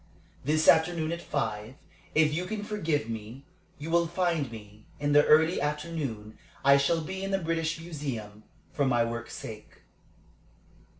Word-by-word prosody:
"This 155 +3 +2
afternoon 160 -1 +4
at 170 0 -3
five, 110 -3 -3 0.4
if 150 -1 +4
you 175 +4 -1
can 210 0 -4
forgive 165 - -1
me, 115 +4 -7 0.3
you 155 +3 -6
will 170 0 +3
find 170 -6 0
me. 105 -1 -12
In 145 0 0
the 145 0 +7
early 160 +3 +5
afternoon 145 -8 -3 0.3
I 140 0 +8
shall 160 +4 +2
be 190 +5 -5
in 195 - -2
the 195 - +2
British 165 -2 -1
Museum, 135 -11 -6 0.3
for 145 - +1
my 120 -2 +3
work's 115 0 -4
sake." 110 -1 -10
150 Hz, 155 wpm, -28 LUFS, 120-165 Hz, 0.4 s, I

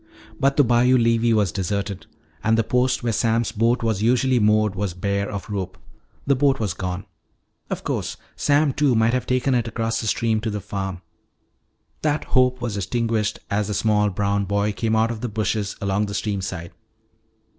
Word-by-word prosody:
But 135 +1 +2
the 145 - +6
bayou 125 +1 +4
levee 115 0 +3
was 105 -5 +2
deserted. 100 +1 -3 0.4
And 110 0 +3
the 115 - +3
post 125 +2 +1
where 115 -1 0
Sam's 115 +1 +1
boat 115 +3 +1
was 110 -3 0
usually 125 +2 +3
moored 105 -1 +3
was 100 -3 -3
bare 100 +2 -1
of 100 -1 -5
rope; 95 -3 -4 0.5
the 140 - +3
boat 135 0 +2
was 105 -6 -1
gone. 90 +1 -4 0.6
Of - - -4
course - - -3 0.2
Sam 145 -1 +2
Two 140 -4 +2
might 110 +1 +3
have 125 -2 -1
taken 130 +1 +1
it 120 -2 +1
across 115 0 -2
the 110 - -4
stream 110 0 +1
to 115 - -2
the 105 -1 -3
farm. 95 -2 -5 1.0
That 150 -1 0
hope 125 -1 +2
was 115 -4 -3
extinguished 110 +1 -1
as 100 0 0
the 105 - -2
small 105 0 +2
brown 100 +1 0
boy 100 +2 0
came 110 +2 -1
out 110 +1 +2
of 110 -2 -6
the 125 - -2
bushes 105 -1 -1
along 100 0 0
the 100 - -5
stream 100 -2 -2
side. 90 -2 -5
110 Hz, 190 wpm, -23 LUFS, 100-120 Hz, 1.0 s, the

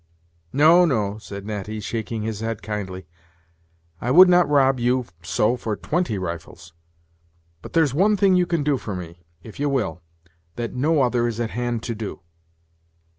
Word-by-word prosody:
"No, 160 +5 +6
no," 110 - 0
said 100 -2 -9
Natty, 105 0 -5
shaking 110 +2 -4
his 110 -2 -4
head 115 -1 -4
kindly; 95 -3 -5 1.0
"I 120 - -2
would 180 +8 +8
not 180 -3 +4
rob 135 -3 +3
you 125 +1 +1 0.2
so 105 +7 +1
for 115 -3 -3
twenty 155 - -1
rifles. 85 -2 -7 0.9
But - - -11
there's 160 -6 +3
one 205 +7 +3
thing 195 -1 +4
you 180 -1 +3
can 170 -4 0
do 145 -1 +1
for 105 -5 -6
me, 85 -1 -9 0.2
if 110 - -12
ye 145 - 0
will, 125 - -1 0.5
that 120 -1 -4
no 145 +3 +2
other 120 -1 +1
is 115 -1 -4
at 115 -2 -2
hand 120 -1 -2
to 115 - -3
do. 110 -3 -6
120 Hz, 170 wpm, -23 LUFS, 105-145 Hz, 1.0 s, would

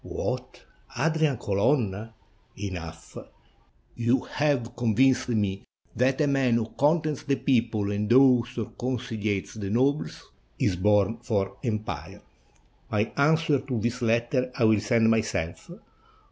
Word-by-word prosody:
"What, - - -5 0.4
Adrian 155 -4 +1
Colonna! 105 0 0 0.5
Enough; 90 -5 -7 0.8
you 120 +2 +1
have 135 -5 -1
con 120 -3 0
vinced 130 +2 +3
me 100 -4 0 0.3
that 130 +2 +1
a - - +4
man 135 -4 +2
who 115 -1 -1
contents 150 0 +1
the 140 - 0
people 115 -7 0
and 105 +2 -2
awes 125 -2 +4
or 115 - -4
conciliates 110 -5 -3
the 100 -3 -5
nobles 135 +7 -1 0.3
is 95 - +1
born 105 +3 +2
for 100 -5 -2
empire. 110 -2 -4 0.7
My 105 +1 0
answer 155 0 +3
to 130 -3 -3
this 120 +3 -2
letter 120 +2 +1
I - - +1
will 110 -1 +4
send 115 +2 +2
myself. 105 -7 -2
115 Hz, 130 wpm, -26 LUFS, 105-130 Hz, 0.8 s, a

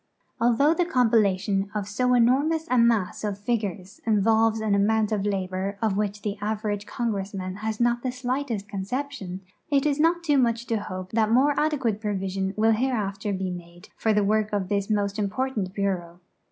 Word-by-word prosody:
Al 240 +1 +4
though 290 +6 +4
the 355 - +1
compilation 205 - +2
of 205 -2 -2
so 250 +5 +1
enormous 285 +7 +2
a 255 - +4
mass 230 -6 +2
of 205 -2 -2
figures 205 -3 -3
involves 220 +1 +3
an 215 -2 0
amount 215 +2 +2
of 205 -1 0
labor 190 0 -2
of 220 -2 +1
wdiich 205 +1 -2
the 205 -1 -2
average 210 -1 -2
Congressman 195 -5 -3
has 215 0 -3
not 240 0 +2
the 255 - -2
slightest 250 -4 -3
conception, 200 -1 -4 0.3
it 280 -1 +2
is 295 -1 +1
not 340 +2 +3
too 295 -4 +3
much 235 -1 +1
to 230 - 0
hope 185 -2 -6
that 220 -1 +2
more 270 +5 +4
adecpiate 270 -9 0
provision 195 -2 -2
will 220 +1 +4
hereafter 215 -4 -1
be 190 -1 -2
made 175 +1 -10
for 220 - +1
the 210 -1 +3
work 215 +1 +1
of 200 -3 -1
this 200 -1 -1
most 205 -1 0
important 210 -1 -1
Bureau. 180 -4 -2
215 Hz, 180 wpm, -25 LUFS, 195-240 Hz, 0.3 s, Al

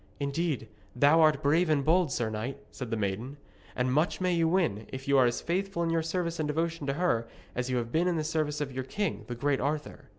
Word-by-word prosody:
'Indeed, 140 -3 -1 0.3
thou 145 +6 +5
art 155 -3 +4
brave 160 +4 +3
and 145 -3 +2
bold, 170 -2 +3
sir 115 -3 -1
knight,' 115 +6 -4
said 125 -3 -6
the 115 - -1
maiden, 110 +7 -3 0.4
'and 125 0 0
much 155 +5 +1
may 185 -1 +1
you 165 -1 +2
win, 160 - +1
if 130 +1 -7
you 140 - +3
are 125 - +6
as 120 - -1
faithful 185 0 -1
in 165 - 0
your 165 0 +2
service 170 0 -2
and 155 - 0
devotion 165 0 -1
to 135 - +1
her 140 -8 +1 0.3
as 125 +1 -2
you 130 - +1
have 115 -1 -2
been 170 +5 +2
in 180 - +1
the 155 - 0
service 155 -1 -1
of 140 -2 -2
your 130 0 -3
king, 200 +7 -3
the 120 - -4
great 140 +2 0
Arthur.' 150 +2 -3
150 Hz, 240 wpm, -29 LUFS, 130-165 Hz, 0.4 s, are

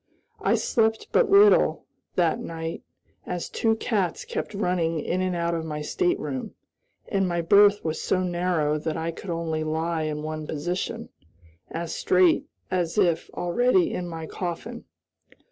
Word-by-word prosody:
I - - +3
slept 220 -1 +1
but - - +3
little, 405 +1 +5 0.3
that 170 -3 +2
night, 165 0 -5 0.5
as 180 -1 -3
two 225 -1 +1
cats 205 -6 -1
kept - - -4
running 175 -5 0
in 180 +4 -1
and 185 -1 0
out 170 0 0
of 165 -1 -2
my 150 -1 -4
stateroom, 265 - -1 0.5
and 195 -3 +1
my 170 0 0
berth 205 +3 +5
was 160 0 -2
so 185 -1 +1
narrow 175 -4 0
that 160 +1 -3
I 165 +1 -2
could 180 +3 -9
only 165 -2 -2
lie 160 +1 -1
in 150 -1 -3
one 155 0 -4
position 175 +5 -3 0.6
as 165 0 -4
straight 180 -2 +3 0.2
as 180 0 -1
if 175 -5 +2
already 185 +1 +2
in 180 - -3
my 165 -1 -6
coffin. 185 +9 -5
175 Hz, 150 wpm, -25 LUFS, 160-195 Hz, 0.6 s, little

